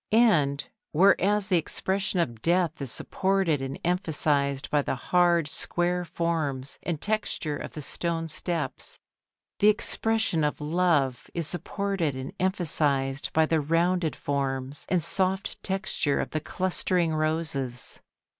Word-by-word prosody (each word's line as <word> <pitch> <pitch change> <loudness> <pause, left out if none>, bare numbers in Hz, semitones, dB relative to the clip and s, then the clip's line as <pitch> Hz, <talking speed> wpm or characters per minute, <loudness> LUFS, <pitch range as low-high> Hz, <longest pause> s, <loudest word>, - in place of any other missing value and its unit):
And 165 -12 +3 0.3
whereas 200 +4 +4
the 180 -3 +4
expression 190 +3 -1
of 120 -9 -1
Death 170 -1 +1
is 135 -4 -1
supported 190 -6 +1
and 135 0 -4
emphasised 150 -6 +1
by 150 - +3
the 135 - -2
hard, 170 +3 +3
square 175 +4 -1
forms 155 -6 -2
and 170 -4 -2
texture 205 -6 -1
of - - -7
the 150 - -6
stone 165 +2 -2
steps, 165 +2 -3 0.6
the 205 - +5
expression 215 -4 +2
of 150 - 0
Love 150 -5 +1
is 170 -2 0
supported 175 -2 -1
and 130 +6 -6
emphasised 145 -7 0
by 160 0 +4
the 160 0 +1
rounded 165 +2 +1
forms 135 -1 -2
and 180 -3 +2
soft 190 +2 -1
texture 190 -7 0
of - - -3
the 155 - -1
clustering 180 -1 0
roses. 155 -5 -1
165 Hz, 130 wpm, -27 LUFS, 145-185 Hz, 0.6 s, the